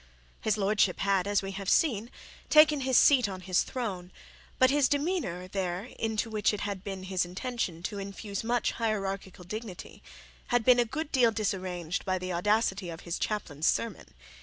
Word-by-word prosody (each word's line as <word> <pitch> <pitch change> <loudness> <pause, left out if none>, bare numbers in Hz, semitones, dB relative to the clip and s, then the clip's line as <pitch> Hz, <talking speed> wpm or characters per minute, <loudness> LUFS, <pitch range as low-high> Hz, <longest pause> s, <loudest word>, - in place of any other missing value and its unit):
His 215 -1 +1
lordship 200 -2 +2
had, 195 -1 +2
as 205 -1 +1
we 195 - -4
have 195 0 -4
seen, 235 -7 +2 0.4
taken 305 -1 +6
his 260 -1 +3
seat 255 -7 +5
on 185 -1 -6
his 185 -1 +2
throne; 190 -8 -4 0.5
but 260 0 +5
his 285 -2 +3
demeanour 285 - -1
there, 185 +3 -3
into 220 0 -1
which 215 -1 +1
it 205 - -6
had 200 -2 -4
been 195 -2 -5
his 185 -1 0
intention 180 -2 -4
to 205 +2 -4
infuse 200 +1 -5
much 235 0 +1
hierarchical 195 -5 -3
dignity, 210 0 -8 0.5
had 245 -2 +1
been 250 -1 +6
a 240 - +4
good 310 +6 -4
deal 250 -4 +5
disarranged 185 -6 -2
by 185 -1 0
the 185 0 -4
audacity 195 0 +1
of 165 0 -7
his 170 - -4
chaplain's 160 -8 -2
sermon. 230 -5 -1
200 Hz, 175 wpm, -29 LUFS, 185-235 Hz, 0.5 s, taken